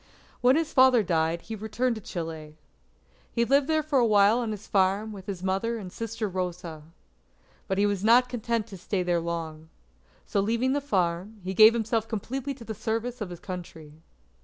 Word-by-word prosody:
When 255 +2 +5
his 320 0 -1
father 260 -4 +6
died, 165 -2 0
he 225 - -6
returned 220 +4 -1
to 220 - -7
Chile. 160 -4 -6 0.7
He 235 -1 +1
lived 275 +3 +3 0.2
for 290 -3 +2
a - - +4
while 210 +2 +5
on 235 -2 -2
his 215 0 -6
farm 195 +2 +1
with 195 -3 -10
his 190 -3 -5
mother 195 +5 -1
and 185 -5 -8
sister 225 -1 -3
Rosa. 180 -4 -4 0.9
But 190 - -1
he 200 - +3
was 200 -2 -1
not 240 +3 +5
content 235 -2 -2
to 195 - -9
stay 185 +1 -2
there 175 -1 +1
long. 160 -2 -5 0.6
So 200 - -1
leaving 230 +6 +1
the 285 - 0
farm, 190 -3 -1
he 190 +1 -3
gave 220 +3 +8
himself 225 -1 -1
completely 260 +5 -4
to 245 - -12
the 220 - -5
service 230 +3 -3
of 205 - -3
his 175 -1 -8
Country. 170 -5 -8
210 Hz, 185 wpm, -27 LUFS, 180-235 Hz, 0.9 s, gave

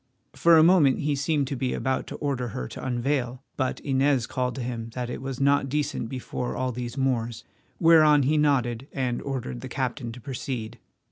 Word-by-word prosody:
For 170 -1 +5
a 155 - +7
moment 160 -6 +5
he 150 0 +1
seemed 145 +1 0
to 140 - -2
be 125 0 -1
about 130 0 -1
to - - -6
order 135 -4 -2
her 65 - -5
to - - -8
unveil, 125 0 -1
but 130 -2 -1
Inez 135 -2 +2
called 125 0 -2
to 130 - -4
him 115 -2 -4
that 125 -1 -3
it - - -5
was 135 -1 -5
not 140 0 +3
decent 145 -5 -2
before 125 -1 -4
all 130 0 -1
these 120 +1 -5
Moors, 120 -4 -1 0.4
whereon 155 -3 +6
he 145 +4 +2
nodded 135 -4 +1
and 125 -3 -2
ordered 125 - -4
the - - -7
captain 115 - -3
to 125 - -10
proceed. 120 -2 -5
130 Hz, 195 wpm, -26 LUFS, 120-140 Hz, 0.4 s, a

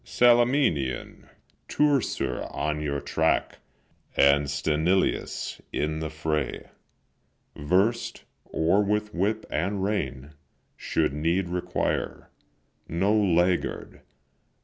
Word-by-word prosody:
Salaminian 120 - +2 0.4
Teucer 145 -4 0
on 75 0 -2
your 70 -1 -2
track, - - 0 0.6
And 70 0 +4
Sthenelus, 80 +6 0
in 75 +1 -1
the 80 -1 -3
fray 75 -1 -3 0.8
Versed, 95 +10 0 0.2
or 85 +6 +2
with 105 +1 -1
whip 105 +5 -1
and 95 +5 -1
rein, 75 -9 -3 0.4
should - - -1
need 85 +5 0
require, 90 0 -2 0.6
No 95 +6 +1
laggard. 90 -3 +1
85 Hz, 85 wpm, -26 LUFS, 75-105 Hz, 0.8 s, And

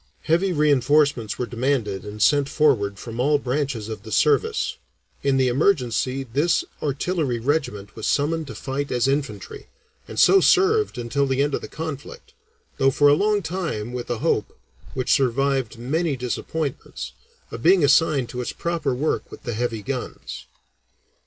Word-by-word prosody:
Heavy 175 +4 +2
reinforcements 145 - +2
were 125 - -1
demanded 120 -5 -1
and 105 0 -3
sent 140 +2 +3
forward 125 -11 +2
from 115 +2 -8
all 145 +4 +3
branches 135 -4 -2
of 110 -3 -6
the 110 - -11
service; 445 - +2 0.4
in 140 -1 +2
the 130 -1 +3
emergency 130 - +1
this 140 +7 +1 0.2
artillery 145 -2 -1
regiment 115 -6 -2
was 110 - -4
summoned 155 +2 0
to - - -8
fight 140 +1 -4
as 125 +1 +1
infantry, 135 -7 -3 0.4
and - - -5
so 390 - +7
served 425 +3 +3
until 130 +4 0
the 135 +1 +1
end 145 0 -1
of - - -1
the - - -7
conflict, 160 - -7 0.5
though 135 - +5
for 145 +2 +4
a - - +6
long 205 +5 +2
time 160 - -3
with 125 -1 -5
a 120 - -1
hope, - - -1 0.4
which 130 -1 -1
survived 135 -1 +1
many 145 +5 -1
disappointments, 135 +4 -4 0.4
of 115 - -6
being 180 +3 +5
assigned 145 -2 +3
to 125 - -4
its 125 - -4
proper 165 -6 -2
work 150 +5 -1
with - - -12
the 120 -4 -3
heavy 115 -1 -2
guns. 130 0 -6
135 Hz, 160 wpm, -23 LUFS, 120-155 Hz, 0.5 s, so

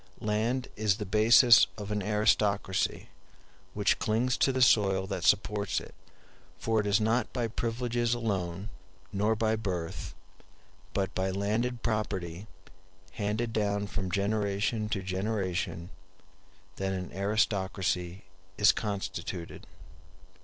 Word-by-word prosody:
Land 115 +5 -1
is 105 -2 +1
the 105 - -4
basis 110 +1 +6
of 105 -1 -6
an 105 0 -1
aristocracy, 105 -1 +1 0.7
which 105 -1 +2
clings 120 +3 +1
to 135 - +3
the 130 - -2
soil 95 -5 +4
that 95 -3 -4
supports 105 +1 +2
it; - - -12 0.6
for 115 -1 0
it 105 - -1
is 100 +1 +3
not 110 +2 +1
by 120 -3 -1
privileges 120 +1 -1
alone, 95 -4 -3 0.4
nor 105 +3 +1
by 110 0 +1
birth, 90 -6 -4 0.8
but 95 -1 -1
by 95 +1 -1
landed 110 +5 -1
property 95 -3 -2 0.6
handed 110 +3 -2
down 100 -1 0
from 100 -2 -4
generation 105 +2 0
to 100 -3 -2
generation, 95 -2 -2 0.9
that 95 0 -1
an 90 -1 -5
aristocracy 95 -2 -1 0.3
is 105 - +6
constituted. 95 -4 -5
105 Hz, 115 wpm, -29 LUFS, 95-110 Hz, 0.9 s, basis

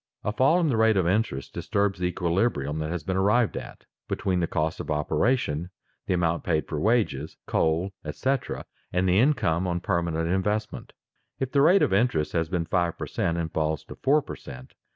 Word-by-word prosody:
A 105 - 0
fall 135 +9 +4
in 165 -3 +2
the 120 - +1
rate 110 -2 +4
of 90 -3 +2
interest 90 -8 -1
disturbs 100 -2 -1
the 90 - +1
equilibrium 85 - 0
that 80 0 -2
has 85 -2 -3
been 95 +3 -2
arrived 105 +4 +2
at, - - -8 0.2
between 95 -2 -1
the 85 - 0
cost 80 +1 -1
of - - -6
operation, 75 - 0 0.4
the 95 - +2
amount 85 -1 0
paid 80 -3 0
for 75 - -3
wages, 110 +4 0
coal, 80 +4 +1
etc., 130 - -2 0.3
and 90 +1 +1
the 90 +2 +4
income 105 - +2
on 90 0 -1
permanent 85 -3 -1
investment. 105 +4 -2 0.5
If 130 -1 -2
the 140 - +3
rate 180 +7 +6
of - - +2
interest 100 -8 +2
has 80 -1 0
been 85 -2 -1
five 85 -1 0
per - - -4
cent. 85 - -1
and 80 -1 -3
falls 80 -1 -1
to - - -10
four 145 +2 +2
per - - -7
cent. 65 0 -11
90 Hz, 195 wpm, -26 LUFS, 80-110 Hz, 0.5 s, rate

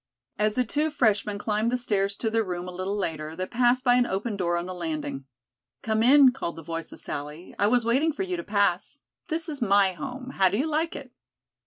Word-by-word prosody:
As 210 0 +1
the 250 - +2
two 300 +7 0
freshmen 215 -7 +1
climbed 215 +2 0
the 250 - +1
stairs 200 -5 0
to 225 +2 -2
their 225 0 +2
room 180 -2 -4
a - - -5
little 185 +3 -3
later, 160 -5 -3
they 185 +2 -3
passed 245 +4 +2
by 245 -1 +5
an 245 -1 +3
open 205 +3 -2
door 175 -3 0
on 170 - -3
the 185 - -5
landing. 155 -6 -4 0.6
"Come 220 0 +1
in," 265 +2 +7
called 250 -9 -5
the 165 - -9
voice 165 +1 -5
of - - -10
Sally. 150 +4 -7
"I 205 - +4
was 240 +1 +2
waiting 270 +8 +2
for 350 +6 -3
you 370 -1 -2
to 340 - -5
pass. 200 +5 0 0.3
This 330 0 -2
is 295 -4 -6
my 200 -3 +4
home. 260 +3 -7
How 190 -1 +5
do 200 - -1
you 275 - +1
like 320 +1 -1
it?" 275 -3 -8
215 Hz, 230 wpm, -26 LUFS, 185-255 Hz, 0.6 s, in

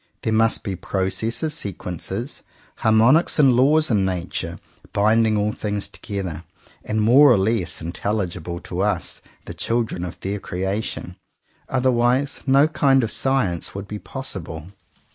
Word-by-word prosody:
There 110 - 0
must 115 +1 +3
be 100 -4 -3
processes, 105 - -2
sequences, 90 - -4 0.4
harmonics 115 +9 +4
and 135 -4 +6
laws 150 +4 +4
in 105 -3 +3
Nature, 85 -2 -3 0.4
binding 110 +1 +3
all 105 +1 +1
things 105 -1 -3
together, 95 -6 -6 0.4
and 110 0 -1
more 135 +5 +7
or 120 - +5
less 95 -3 0
intelligible 85 -1 -3
to 90 +1 -4
us, 105 +1 -1 0.2
the - - -7
children 115 -6 -1
of 90 -1 -6
their 100 +2 -3
creation, 95 -1 -4 0.5
otherwise 130 +1 +1
no 135 +3 +5
kind 135 -4 +3
of 110 - -1
science 115 -13 0
would 100 0 -6
be 105 0 -6
possible. 85 - -6
105 Hz, 135 wpm, -22 LUFS, 95-125 Hz, 0.5 s, more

